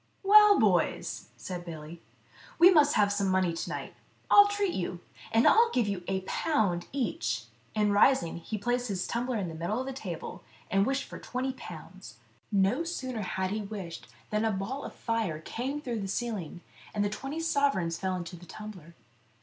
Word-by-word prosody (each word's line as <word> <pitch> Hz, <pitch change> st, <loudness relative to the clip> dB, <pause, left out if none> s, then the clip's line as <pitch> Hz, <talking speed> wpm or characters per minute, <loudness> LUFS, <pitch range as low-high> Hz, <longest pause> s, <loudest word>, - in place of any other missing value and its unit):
"Well, 420 Hz, +1 st, +8 dB
boys," -, -, +1 dB
said 180 Hz, -2 st, -6 dB
Billy, 165 Hz, 0 st, -9 dB, 0.6 s
"we 350 Hz, +3 st, +8 dB
must 295 Hz, -4 st, +5 dB
have 205 Hz, -1 st, +3 dB
some 200 Hz, -1 st, 0 dB
money 185 Hz, -2 st, +2 dB
to 165 Hz, -, -4 dB
night. -, -, -5 dB, 0.4 s
I'll 410 Hz, 0 st, +9 dB
treat 410 Hz, -2 st, 0 dB
you, 180 Hz, -1 st, -3 dB, 0.3 s
and 225 Hz, +1 st, +4 dB, 0.3 s
give 240 Hz, -4 st, +2 dB
you 195 Hz, -3 st, -3 dB
a 190 Hz, 0 st, 0 dB
pound 190 Hz, -, 0 dB
each," 115 Hz, -, -1 dB, 0.3 s
and 210 Hz, -1 st, +2 dB
rising, 200 Hz, -5 st, +4 dB
he 190 Hz, +6 st, -5 dB
placed 245 Hz, +4 st, -1 dB
his 190 Hz, -4 st, -2 dB
tumbler 240 Hz, +1 st, -1 dB
in 195 Hz, -4 st, -2 dB
the 165 Hz, -, -6 dB
middle 170 Hz, +8 st, -2 dB
of 260 Hz, -, -3 dB
the 270 Hz, -, -4 dB
table, 185 Hz, -10 st, -6 dB, 0.3 s
and 195 Hz, +1 st, +3 dB
wished 270 Hz, +1 st, 0 dB
for -, -, -9 dB
twenty 260 Hz, +1 st, -3 dB
pounds. 165 Hz, -, -10 dB, 0.3 s
No 200 Hz, +9 st, +2 dB
sooner 260 Hz, -9 st, -4 dB
had 190 Hz, -1 st, -2 dB
he 215 Hz, +1 st, -1 dB
wished 195 Hz, -5 st, -7 dB, 0.2 s
than 210 Hz, +1 st, +1 dB
a 225 Hz, -, +2 dB
ball 210 Hz, +8 st, -3 dB
of -, -, -8 dB
fire 225 Hz, -9 st, -1 dB
came 255 Hz, -, -4 dB
through 245 Hz, -6 st, -3 dB
the 195 Hz, -, -3 dB
ceiling, 195 Hz, -6 st, -3 dB, 0.3 s
and 205 Hz, -1 st, +1 dB
the -, -, +2 dB
twenty 270 Hz, +9 st, -5 dB
sovereigns 280 Hz, -, +1 dB
fell 190 Hz, -1 st, -1 dB
into 175 Hz, 0 st, -6 dB
the 175 Hz, +1 st, -13 dB
tumbler. 185 Hz, -6 st, -10 dB
210 Hz, 180 wpm, -29 LUFS, 180-260 Hz, 0.6 s, I'll